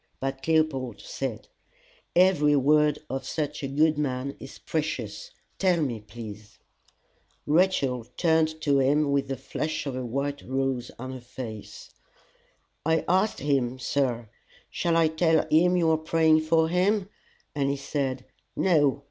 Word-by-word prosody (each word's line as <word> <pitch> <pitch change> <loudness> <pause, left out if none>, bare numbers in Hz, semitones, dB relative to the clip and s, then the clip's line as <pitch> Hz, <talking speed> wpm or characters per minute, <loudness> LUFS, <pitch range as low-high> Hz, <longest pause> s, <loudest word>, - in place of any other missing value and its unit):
But 135 +1 -4
Leopold 155 -5 +1
said, - - -5 0.7
"Every 170 -5 +4
word 150 +2 +3
of 135 +1 -4
such 150 -2 -3
a 140 - -2
good 150 +2 +2
man 140 -1 -2
is 135 - -10
precious: 160 - -4 0.3
tell 185 -3 +3
me, 130 -7 -1
please." 105 -1 -10 0.9
Rachel 145 -7 +2
turned 160 -2 +2
to 140 -2 +3
him 145 +2 +2
with 140 -1 +1
the 135 0 -3
flush 155 +4 -4
of 135 -3 -3
a 130 - -3
white 140 +4 -3
rose 130 -2 -2
on 130 +2 -6
her 130 -1 -8
face. 120 -3 -9 0.9
"I 160 +1 +1
asked 190 +4 +1
him, 130 -3 0
sir 125 -4 -1 0.4
'Shall 170 -1 +1
I 165 -1 +5
tell 160 0 +2
him 180 +3 +4
you 165 -2 +3
are 160 - +3
praying 160 0 +3
for 160 +1 +2
him?' 185 +4 +1 0.5
and 140 -2 0
he 140 - -1
said, 135 -2 -3 0.3
'No. 145 -7 +3
145 Hz, 145 wpm, -26 LUFS, 130-160 Hz, 0.9 s, I